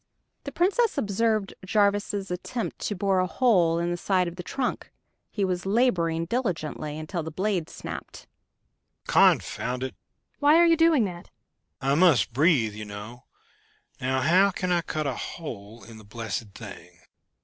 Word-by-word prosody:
The -, -, -5 dB
Princess 410 Hz, +6 st, +1 dB
observed 215 Hz, 0 st, 0 dB
Jarvis' 200 Hz, -1 st, 0 dB
attempt 225 Hz, +6 st, -4 dB
to 205 Hz, -, -2 dB
bore 195 Hz, 0 st, +1 dB
a 185 Hz, -, +1 dB
hole 180 Hz, -8 st, +3 dB
in 170 Hz, +1 st, -1 dB
the 175 Hz, -, -2 dB
side 185 Hz, 0 st, +1 dB
of 170 Hz, -, -6 dB
the 180 Hz, -, -6 dB
trunk. 250 Hz, +8 st, -3 dB, 0.4 s
He 200 Hz, -3 st, -1 dB
was 185 Hz, 0 st, -2 dB
laboring 175 Hz, -8 st, +1 dB
diligently, 160 Hz, -, -3 dB
until 155 Hz, +3 st, -4 dB
the 160 Hz, -, -5 dB
blade 185 Hz, 0 st, -1 dB
snapped. -, -, -8 dB, 0.8 s
"Confound 125 Hz, +1 st, +2 dB
it!" 130 Hz, -, -4 dB, 0.5 s
"Why 295 Hz, +1 st, +5 dB
are 345 Hz, -, +6 dB
you 335 Hz, -1 st, +5 dB
doing 325 Hz, -7 st, +4 dB
that?" 175 Hz, -2 st, -7 dB, 0.5 s
"I 135 Hz, +1 st, +1 dB
must 150 Hz, -, +4 dB
breathe, 135 Hz, -, +3 dB
you 105 Hz, +1 st, -7 dB
know... 105 Hz, +4 st, -9 dB, 0.7 s
Now, 130 Hz, +1 st, 0 dB
how 185 Hz, +8 st, +4 dB
can 185 Hz, -1 st, -3 dB
I 175 Hz, -1 st, +3 dB
cut 155 Hz, -2 st, -3 dB
a 135 Hz, -, -1 dB
hole 115 Hz, -, -8 dB
in 115 Hz, -1 st, -12 dB
the -, -, -14 dB
blessed 105 Hz, -1 st, -6 dB
thing?" 90 Hz, -5 st, -11 dB
175 Hz, 160 wpm, -26 LUFS, 130-205 Hz, 0.8 s, are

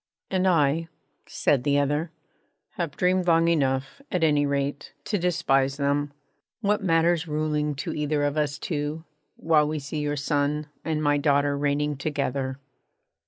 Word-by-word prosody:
'And 190 Hz, 0 st, +2 dB
I,' 165 Hz, -1 st, +2 dB, 0.4 s
said 135 Hz, -4 st, +1 dB
the 145 Hz, +1 st, +2 dB
other, 145 Hz, +3 st, 0 dB, 0.6 s
'have 170 Hz, -8 st, -4 dB
dreamed 180 Hz, 0 st, +2 dB
long 165 Hz, 0 st, +4 dB
enough, 140 Hz, -, 0 dB
at 180 Hz, -2 st, 0 dB
any 145 Hz, -2 st, +3 dB
rate, 140 Hz, 0 st, -2 dB
to 205 Hz, -, -1 dB
despise 140 Hz, -6 st, +1 dB
them. 145 Hz, 0 st, 0 dB, 0.5 s
What 210 Hz, -1 st, +1 dB
matters 170 Hz, -1 st, +2 dB
ruling 150 Hz, -1 st, -1 dB
to 135 Hz, -, -4 dB
either 150 Hz, -1 st, 0 dB
of 145 Hz, 0 st, 0 dB
us 145 Hz, -2 st, 0 dB
two, 150 Hz, 0 st, -3 dB, 0.3 s
while 155 Hz, -2 st, +3 dB
we 155 Hz, +1 st, -2 dB
see 145 Hz, +2 st, -5 dB
your 145 Hz, 0 st, -1 dB
son 145 Hz, +1 st, 0 dB, 0.2 s
and 155 Hz, -1 st, -1 dB
my 145 Hz, -1 st, +3 dB
daughter 145 Hz, -1 st, +2 dB
reigning 145 Hz, 0 st, 0 dB
together?' 140 Hz, -2 st, -2 dB
150 Hz, 150 wpm, -25 LUFS, 145-165 Hz, 0.6 s, long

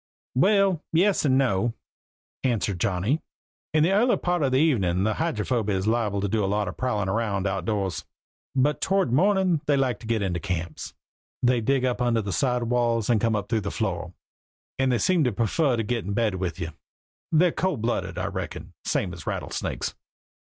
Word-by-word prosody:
"Well, 195 Hz, +3 st, +3 dB
yes 185 Hz, +2 st, +3 dB
and 130 Hz, -2 st, +4 dB
no," 120 Hz, -3 st, +1 dB, 0.7 s
answered 110 Hz, -7 st, 0 dB
Johnny. 100 Hz, -, 0 dB, 0.5 s
"In 155 Hz, -1 st, +3 dB
the 175 Hz, -, +3 dB
early 235 Hz, +5 st, +3 dB
part 175 Hz, -1 st, 0 dB
of 135 Hz, -2 st, +2 dB
the 130 Hz, -, +3 dB
evening 100 Hz, -, +2 dB
a 110 Hz, -, +2 dB
Hydrophoby 115 Hz, -7 st, -1 dB
is 95 Hz, 0 st, -1 dB
liable 110 Hz, -3 st, +1 dB
to 100 Hz, -, 0 dB
do 105 Hz, +1 st, 0 dB
a -, -, +1 dB
lot 105 Hz, +1 st, 0 dB
of -, -, -5 dB
prowlin' 105 Hz, -6 st, -1 dB
round 100 Hz, -1 st, -1 dB
outdoors; 95 Hz, -1 st, -1 dB, 0.5 s
but 145 Hz, +3 st, +2 dB
toward 195 Hz, -10 st, +1 dB
mornin' 185 Hz, 0 st, +3 dB
they 145 Hz, -1 st, +3 dB
like 130 Hz, -5 st, 0 dB
to 115 Hz, -, -10 dB
get 110 Hz, -3 st, 0 dB
into 90 Hz, -3 st, -1 dB
camps 85 Hz, -4 st, -4 dB, 0.5 s
they 125 Hz, -1 st, +3 dB
dig 130 Hz, +3 st, +1 dB
up 125 Hz, -1 st, -1 dB
under 120 Hz, -2 st, +2 dB
the 100 Hz, -2 st, -3 dB
side 125 Hz, -4 st, +1 dB
walls 120 Hz, -1 st, +1 dB
or 115 Hz, -, +3 dB
come 115 Hz, 0 st, +1 dB
up 105 Hz, -1 st, -2 dB
through 110 Hz, 0 st, 0 dB
the -, -, -3 dB
floor -, -, -3 dB, 0.7 s
and 130 Hz, -1 st, +2 dB
they 120 Hz, -, +2 dB
seem 175 Hz, +5 st, +2 dB
to 125 Hz, -, +2 dB
prefer 120 Hz, +5 st, +1 dB
to 115 Hz, -, 0 dB
get 115 Hz, +1 st, -2 dB
in 100 Hz, -, -3 dB
bed 110 Hz, -1 st, +1 dB
with 90 Hz, -1 st, -3 dB
you. 85 Hz, -2 st, -3 dB, 0.6 s
They're 170 Hz, +2 st, +4 dB
cold 155 Hz, -12 st, -1 dB
blooded, 120 Hz, -, -1 dB
I -, -, -1 dB
reckin, -, -, -5 dB
same 90 Hz, -3 st, -1 dB
as 80 Hz, -4 st, -10 dB
rattlesnakes. -, -, -3 dB
115 Hz, 195 wpm, -25 LUFS, 100-140 Hz, 0.7 s, and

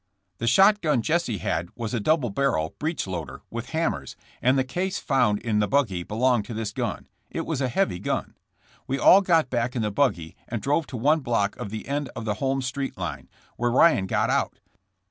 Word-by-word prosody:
''The 115 Hz, -, -2 dB
shotgun 190 Hz, -, +4 dB
Jesse 160 Hz, -9 st, 0 dB
had 85 Hz, 0 st, -2 dB
was 115 Hz, -1 st, -4 dB
a 120 Hz, -, 0 dB
double 130 Hz, 0 st, +1 dB
barrel, 100 Hz, -11 st, 0 dB
breech 160 Hz, +2 st, -2 dB
loader, 90 Hz, -4 st, -6 dB
with -, -, -5 dB
hammers, -, -, -2 dB, 0.3 s
and 130 Hz, +2 st, +3 dB
the 130 Hz, -, +3 dB
case 185 Hz, +8 st, -2 dB
found 125 Hz, -7 st, +2 dB
in 105 Hz, -1 st, -1 dB
the 105 Hz, -, +2 dB
buggy 110 Hz, -10 st, +1 dB
belonged 115 Hz, +3 st, +1 dB
to 115 Hz, -, -7 dB
this 110 Hz, -1 st, -3 dB
gun. -, -, -3 dB, 0.2 s
It -, -, -4 dB
was 135 Hz, -, -2 dB
a 130 Hz, -, +1 dB
heavy 125 Hz, -, 0 dB
gun. 100 Hz, -, -2 dB, 0.5 s
*'We 135 Hz, -, -1 dB
all 185 Hz, +9 st, +7 dB
got 165 Hz, -7 st, +2 dB
back 120 Hz, 0 st, -1 dB
in 120 Hz, -, 0 dB
the 105 Hz, -, -1 dB
buggy 95 Hz, -, 0 dB
and 115 Hz, -, -3 dB
drove 145 Hz, +6 st, 0 dB
to 125 Hz, -, -6 dB
one 150 Hz, +7 st, +3 dB
block 115 Hz, -7 st, 0 dB
of -, -, -5 dB
the 110 Hz, +1 st, -6 dB
end 140 Hz, 0 st, -2 dB
of 115 Hz, -, -5 dB
the 105 Hz, -, 0 dB
Holmes 135 Hz, -1 st, 0 dB
street 135 Hz, +2 st, -3 dB
line, -, -, -5 dB, 0.3 s
where 120 Hz, 0 st, +1 dB
Ryan 120 Hz, -, +4 dB
got -, -, +1 dB
out. -, -, 0 dB
125 Hz, 205 wpm, -25 LUFS, 105-145 Hz, 0.5 s, all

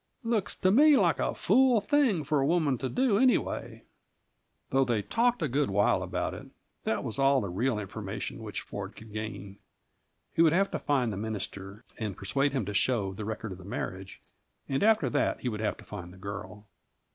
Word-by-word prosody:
Looks 230 Hz, -4 st, -1 dB
to 185 Hz, -, +2 dB
me 290 Hz, +6 st, +7 dB
like -, -, +3 dB
a -, -, 0 dB
fool 260 Hz, -3 st, +4 dB
thing 240 Hz, -, +2 dB
for 150 Hz, +1 st, +1 dB
a -, -, +2 dB
woman 155 Hz, -5 st, +2 dB
to 130 Hz, -, -2 dB
do, 245 Hz, -5 st, +2 dB
anyway." 255 Hz, 0 st, +1 dB, 0.9 s
Though 135 Hz, 0 st, +4 dB
they 120 Hz, -5 st, 0 dB
talked 240 Hz, -, +1 dB
a -, -, +2 dB
good 140 Hz, +3 st, 0 dB
while 100 Hz, +1 st, +2 dB
about -, -, -2 dB
it, -, -, -9 dB, 0.4 s
that 110 Hz, -, 0 dB
was 120 Hz, 0 st, -4 dB
all 135 Hz, 0 st, +4 dB
the 100 Hz, -, -3 dB
real 120 Hz, +5 st, 0 dB
information 100 Hz, -1 st, -5 dB
which -, -, -5 dB
Ford -, -, -7 dB
could 110 Hz, -1 st, -13 dB
gain. 105 Hz, -2 st, -6 dB, 0.7 s
He -, -, +2 dB
would 165 Hz, -2 st, +5 dB
have 195 Hz, +3 st, +2 dB
to -, -, -2 dB
find 125 Hz, -6 st, +1 dB
the -, -, -5 dB
minister 100 Hz, 0 st, -5 dB, 0.2 s
and 105 Hz, -4 st, -3 dB
persuade 135 Hz, +8 st, 0 dB
him 130 Hz, -7 st, -1 dB
to 105 Hz, -, -4 dB
show 100 Hz, -2 st, +1 dB
the 105 Hz, +2 st, -6 dB
record 110 Hz, 0 st, -4 dB
of 90 Hz, -, -8 dB
the -, -, -11 dB
marriage, 95 Hz, 0 st, -5 dB, 0.5 s
and 135 Hz, 0 st, -1 dB
after 215 Hz, -9 st, +4 dB
that 120 Hz, -, 0 dB
he 125 Hz, -, -1 dB
would 105 Hz, -2 st, -4 dB
have 105 Hz, -, -1 dB
to -, -, -14 dB
find 90 Hz, -4 st, -8 dB
the 90 Hz, -, -14 dB
girl. 100 Hz, +1 st, -7 dB
120 Hz, 205 wpm, -29 LUFS, 100-165 Hz, 0.9 s, me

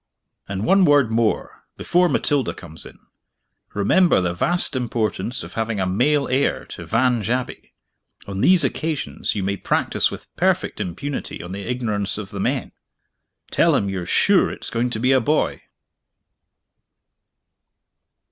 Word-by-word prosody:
"And 100 Hz, +2 st, -3 dB
one 195 Hz, +8 st, +5 dB
word 145 Hz, -7 st, +4 dB
more, 115 Hz, -1 st, -1 dB
before 180 Hz, 0 st, +2 dB
Matilda 145 Hz, -6 st, 0 dB
comes 80 Hz, -3 st, -11 dB
in. -, -, -15 dB, 0.8 s
Remember 170 Hz, -, +4 dB
the 90 Hz, -1 st, -1 dB
vast 175 Hz, -, 0 dB
importance 115 Hz, -2 st, -2 dB
of -, -, -10 dB
having 110 Hz, -2 st, -2 dB
a 95 Hz, -, +1 dB
male 135 Hz, +10 st, +2 dB
heir 135 Hz, +2 st, 0 dB
to -, -, -8 dB
Vange 115 Hz, -2 st, +1 dB
Abbey. 125 Hz, +1 st, -3 dB, 0.5 s
On 100 Hz, 0 st, -4 dB
these 180 Hz, -3 st, +5 dB
occasions 155 Hz, 0 st, -2 dB
you 100 Hz, -, -2 dB
may 100 Hz, +1 st, -1 dB
practice -, -, +1 dB
with -, -, -10 dB
perfect -, -, 0 dB
impunity 95 Hz, -, -5 dB
on 90 Hz, -, -8 dB
the 100 Hz, +1 st, -5 dB
ignorance 110 Hz, -5 st, -2 dB
of 105 Hz, -2 st, -7 dB
the 100 Hz, -, -6 dB
men. -, -, -1 dB, 0.8 s
Tell -, -, +3 dB
him 100 Hz, -, 0 dB
you're 90 Hz, -2 st, -4 dB
sure -, -, +3 dB
it's -, -, -7 dB
going 120 Hz, +2 st, 0 dB
to 110 Hz, -, -3 dB
be 125 Hz, +3 st, +2 dB
a 130 Hz, -1 st, +4 dB
boy!" 150 Hz, +7 st, 0 dB
115 Hz, 145 wpm, -22 LUFS, 100-140 Hz, 0.8 s, one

